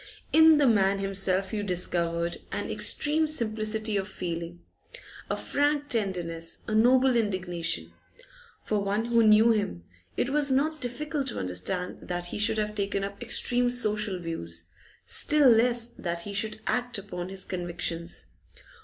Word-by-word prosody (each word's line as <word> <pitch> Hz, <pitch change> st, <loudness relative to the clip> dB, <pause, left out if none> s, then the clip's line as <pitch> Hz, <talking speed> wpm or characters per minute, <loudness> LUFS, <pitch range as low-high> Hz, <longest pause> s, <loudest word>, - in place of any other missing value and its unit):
In 320 Hz, -1 st, +7 dB
the 290 Hz, -, +3 dB
man 200 Hz, -5 st, +3 dB
himself 195 Hz, 0 st, 0 dB
you 210 Hz, -, -1 dB
discovered 170 Hz, -3 st, 0 dB
an -, -, -3 dB
extreme 310 Hz, +1 st, +2 dB
simplicity 215 Hz, -5 st, -1 dB
of 195 Hz, 0 st, -2 dB
feeling, 170 Hz, -1 st, -6 dB, 0.7 s
a -, -, 0 dB
frank 290 Hz, 0 st, -1 dB
tenderness, 175 Hz, -8 st, -2 dB
a 215 Hz, -, -3 dB
noble 250 Hz, +3 st, +4 dB
indignation. 185 Hz, -6 st, -2 dB, 0.7 s
For 210 Hz, -, -1 dB
one 200 Hz, +3 st, -1 dB
who 235 Hz, 0 st, +3 dB
knew 220 Hz, +1 st, +6 dB
him 200 Hz, -, -2 dB, 0.3 s
it 255 Hz, -, 0 dB
was 290 Hz, 0 st, +3 dB
not 295 Hz, +4 st, 0 dB
difficult 275 Hz, +3 st, -3 dB
to 245 Hz, -, -4 dB
understand 95 Hz, -, -1 dB
that 175 Hz, 0 st, -3 dB
he 175 Hz, -, -5 dB
should 220 Hz, +1 st, +1 dB
have 210 Hz, 0 st, -1 dB
taken 200 Hz, -1 st, -2 dB
up 200 Hz, +2 st, -6 dB
extreme 245 Hz, +1 st, +2 dB
social 210 Hz, -5 st, -1 dB
views, 85 Hz, -, -5 dB, 0.4 s
still 295 Hz, -2 st, +5 dB
less 235 Hz, +1 st, +3 dB
that 170 Hz, -1 st, -3 dB
he 200 Hz, +4 st, -7 dB
should 215 Hz, +1 st, 0 dB
act 245 Hz, -1 st, -1 dB
upon 185 Hz, -3 st, -6 dB
his 190 Hz, -1 st, -3 dB
convictions. 175 Hz, -1 st, -3 dB
210 Hz, 145 wpm, -27 LUFS, 180-245 Hz, 0.7 s, In